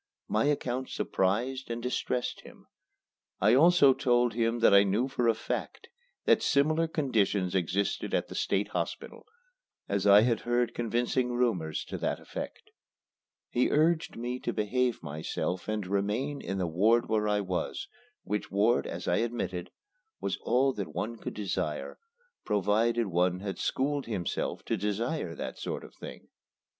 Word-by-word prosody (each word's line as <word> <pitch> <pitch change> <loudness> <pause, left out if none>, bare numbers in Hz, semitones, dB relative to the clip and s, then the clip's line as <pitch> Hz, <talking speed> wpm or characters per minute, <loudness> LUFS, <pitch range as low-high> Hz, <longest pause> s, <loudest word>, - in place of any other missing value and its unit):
My 110 +5 +1
account 130 -3 -1
surprised 120 +8 -1
and 115 0 -3
distressed 125 0 -2
him. - - -15 0.7
I 105 +4 +4
also 145 -1 +6
told 120 -2 +2
him 115 +1 +1
that - - +6
I 100 - +9
knew 100 +6 +1
for 125 -3 0
a 115 - +4
fact 110 - -5 0.4
that - - +4
similar 155 +3 +2
conditions 105 - 0
existed 95 +2 0
at - - 0
the - - -9
State - - 0
Hospital, - - -5 0.6
as 100 0 0
I 100 +1 +8
had 115 -1 +2
heard 120 0 0
convincing 120 +2 0
rumors 105 -11 0
to - - -6
that - - -1
effect. - - -8 0.8
He 125 - +2
urged 160 +2 +2
me 125 +2 -3
to - - -2
behave 120 +2 0
myself 80 +4 -3
and 105 -2 -2
remain 105 +9 -1
in 95 - -3
the 95 - 0
ward 105 +8 +3
where 110 -1 +1
I 105 0 +2
was, 95 - -3 0.4
which 105 0 -3
ward, 110 +5 +2
as 85 +1 -6
I 90 - +2
admitted, 110 -7 -2 0.5
was - - -1
all 135 +2 +2
that 100 -5 -6
one 115 +2 -3
could - - -6
desire 90 -7 -3 0.4
provided 110 +4 +2
one 90 0 +1
had 100 -1 -4
schooled 140 +1 -1
himself 100 -7 -3
to 115 - 0
desire 105 - -2
that - - -6
sort - - -4
of - - -12
thing. - - -10
115 Hz, 155 wpm, -29 LUFS, 100-125 Hz, 0.8 s, I